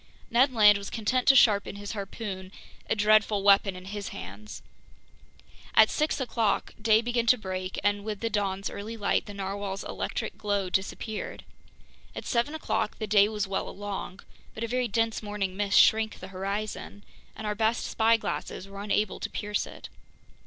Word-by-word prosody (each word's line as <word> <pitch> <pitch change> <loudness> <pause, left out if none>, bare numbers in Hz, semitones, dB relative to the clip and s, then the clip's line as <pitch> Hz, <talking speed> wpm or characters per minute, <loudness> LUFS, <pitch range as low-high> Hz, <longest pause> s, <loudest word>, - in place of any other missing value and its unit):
Ned 255 +4 +4
Land 210 -4 +6
was 200 - -7
content 245 +3 -1
to 270 - +8
sharpen 205 -6 +4
his 205 0 -6
harpoon, 195 -2 -6 0.4
a - - +2
dreadful 210 -1 +3
weapon 200 -1 +5
in 185 0 -10
his 205 0 -5
hands. 210 +2 -9 1.1
At - - +7
six 305 -1 0
o'clock 230 -4 0
day 220 +1 +4
began 240 0 0
to 250 - +6
break, 185 -3 -4
and 205 0 +1
with 210 -1 -4
the 230 - -1
dawn's 195 -1 -1
early 220 +3 -6
light, 205 0 0
the 205 - -7
narwhale's 195 0 -4
electric - - -4
glow 200 -3 -1
disappeared. 210 +3 -3 0.7
At - - -6
seven 245 +5 0
o'clock 315 - -2
the 220 - -3
day 205 0 +5
was 210 -2 -2
well 195 - -2
along, 200 -1 -6 0.3
but 220 - -4
a - - -1
very 250 +1 0
dense 225 -1 0
morning 205 -3 -3
mist 200 0 +3
shrank 220 -1 +4
the - - -9
horizon, 200 +2 -4 0.3
and 220 - -7
our 210 - 0
best 220 +2 0
spyglasses 225 -3 0
were 195 0 -8
unable 210 0 0
to - - -4
pierce 210 0 -2
it. - - -10
210 Hz, 170 wpm, -28 LUFS, 200-225 Hz, 1.1 s, to